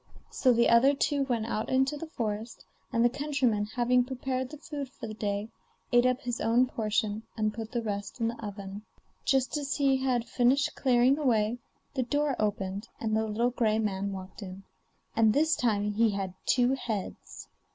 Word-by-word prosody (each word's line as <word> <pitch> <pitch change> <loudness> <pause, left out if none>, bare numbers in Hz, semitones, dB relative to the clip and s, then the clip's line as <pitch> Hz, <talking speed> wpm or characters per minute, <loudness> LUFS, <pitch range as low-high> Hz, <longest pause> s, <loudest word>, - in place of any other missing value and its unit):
So 255 - +3
the 235 0 +4
other 260 +5 +5
two 285 -1 +1
went 235 -4 -1
out 220 -1 -2
into 265 +3 +2
the 320 +3 -6
forest, 220 -4 -4 0.3
and 230 +1 +3
the - - +8
countryman 255 -5 0
having 245 +2 +2
prepared 260 0 -3
the 300 - -9
food 285 -2 -6
for 255 - -9
the 215 - -6
day, 205 0 -2 0.4
ate 240 +1 +5
up 255 +1 0
his 245 -3 -3
own 230 +3 +4
portion, 215 -2 -1 0.2
and 215 -1 0
put 220 0 -6
the 235 -1 -2
rest 205 +1 -4
in 230 - +1
the 230 0 -5
oven. 200 -1 -6 0.4
Just 265 +1 +2
as 285 -1 -2
he 275 -2 +3
had 255 -3 0
finished 255 +4 +2
clearing 255 +2 +3
away, 235 -4 +1 0.3
the 265 - 0
door 290 +2 0
opened 200 0 -2
and 220 -1 -1
the 220 0 +1
little 230 +3 +1
gray 220 -3 +1
man 200 -2 -1
walked 190 +1 -8
in, 190 0 -8 0.5
and 220 -1 +4
this 315 +4 +3
time 210 -3 +1
he 225 +2 +3
had 195 -3 -3
two 250 0 +3
heads. 230 -7 -5
235 Hz, 185 wpm, -29 LUFS, 215-260 Hz, 0.5 s, the